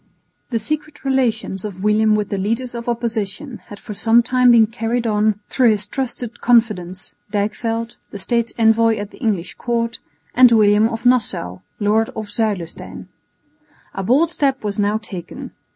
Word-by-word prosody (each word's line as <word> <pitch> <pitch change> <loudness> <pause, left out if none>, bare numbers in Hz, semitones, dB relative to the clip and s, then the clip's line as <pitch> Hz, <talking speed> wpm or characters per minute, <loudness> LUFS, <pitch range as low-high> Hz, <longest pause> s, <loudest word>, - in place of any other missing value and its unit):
The 235 - 0
secret 300 +5 -3
relations 235 -7 0
of 195 -3 -7
William 215 0 +3
with 210 -1 -1
the 200 - -2
leaders 230 +6 -1
of 235 0 -5
opposition 235 +2 -3
had 205 - -10
for 210 - -8
some 225 +3 +4
time 250 +1 +3
been 230 -2 +7
carried 230 +2 -2
on 210 -1 +1
through 250 -3 +3
his 210 -1 0
trusted 245 -1 -4
confidants, 210 -7 +1 0.2
Dijkveld, 225 +3 -2
the - - -8
State's 235 +3 -1
envoy 225 0 +3
at 205 0 -6
the - - -16
English 205 -8 -1
Court, 230 -1 -2 0.3
and 250 -1 +7
William 215 0 +4
of 225 +1 -6
Nassau, 210 - +1 0.2
lord 215 +2 +2
of 215 -1 -5
Zuilestein. 205 -6 -3 0.8
A 195 - -4
bold 275 - +2
step 275 -6 0
was 205 0 -3
now 205 +1 +1
taken. 190 -6 -8
225 Hz, 160 wpm, -19 LUFS, 205-240 Hz, 0.8 s, been